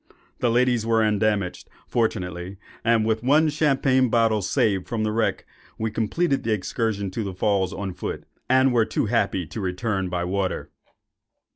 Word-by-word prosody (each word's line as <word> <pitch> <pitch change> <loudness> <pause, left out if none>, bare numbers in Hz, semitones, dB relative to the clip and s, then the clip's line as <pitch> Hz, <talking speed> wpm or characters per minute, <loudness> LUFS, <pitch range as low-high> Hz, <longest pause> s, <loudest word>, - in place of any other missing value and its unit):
The 125 - +2
ladies 120 -1 +2
were 115 0 +2
undamaged, 105 -3 0 0.2
fortunately; 90 -5 -2 0.3
and, 115 -1 +3
with 110 0 0
one 150 +5 +4
champagne 135 -4 +2
bottle 110 -2 +2
saved 95 0 +1
from 115 -2 -2
the 110 - 0
wreck, 110 +1 0 0.3
we 110 0 -2
completed 135 +8 0
the 115 - 0
excursion 100 -1 -2
to 110 +4 -3
the 95 -2 -5
Falls 95 -1 +1
on 100 -2 -4
foot, - - -5 0.3
and 130 0 +4
were 115 -2 +4
too - - -1
happy 105 -5 0
to 105 +8 -6
return 95 0 -2
by 90 -1 -2
water. 95 +1 -2
110 Hz, 160 wpm, -24 LUFS, 95-120 Hz, 0.3 s, one